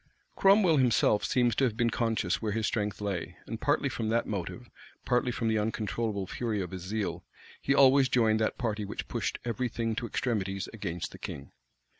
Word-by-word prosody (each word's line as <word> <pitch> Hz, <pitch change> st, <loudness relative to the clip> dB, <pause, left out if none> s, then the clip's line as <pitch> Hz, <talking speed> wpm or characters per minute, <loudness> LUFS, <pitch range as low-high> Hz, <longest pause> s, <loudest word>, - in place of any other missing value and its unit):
Cromwell 195 Hz, -5 st, +5 dB
himself 120 Hz, -5 st, +3 dB
seems 120 Hz, -2 st, +2 dB
to -, -, +2 dB
have 115 Hz, -4 st, +1 dB
been 120 Hz, -1 st, +2 dB
conscious 110 Hz, -5 st, 0 dB
where 110 Hz, -2 st, -1 dB
his 110 Hz, 0 st, 0 dB
strength 105 Hz, -2 st, -2 dB
lay; 100 Hz, -4 st, -3 dB
and -, -, -6 dB
partly -, -, +2 dB
from 110 Hz, -1 st, -2 dB
that 115 Hz, +1 st, +1 dB
motive, 105 Hz, +5 st, -5 dB, 0.4 s
partly 125 Hz, 0 st, +2 dB
from 115 Hz, -1 st, -2 dB
the 110 Hz, -1 st, +2 dB
uncontrollable 105 Hz, -1 st, -2 dB
fury 110 Hz, +1 st, -2 dB
of 90 Hz, -3 st, -4 dB
his 95 Hz, -1 st, -6 dB
zeal, 100 Hz, +2 st, -3 dB, 0.4 s
he 140 Hz, -, +2 dB
always 135 Hz, -1 st, +6 dB
joined 110 Hz, -3 st, +3 dB
that 110 Hz, -, 0 dB
party 110 Hz, -4 st, -2 dB
which 100 Hz, -, -5 dB
pushed -, -, -2 dB
every 120 Hz, +1 st, -1 dB
thing 115 Hz, 0 st, -2 dB
to 120 Hz, +2 st, -3 dB
extremities 100 Hz, -5 st, -2 dB
against 90 Hz, -6 st, -4 dB
the -, -, -11 dB
king. 70 Hz, -, -7 dB
110 Hz, 190 wpm, -29 LUFS, 105-120 Hz, 0.4 s, always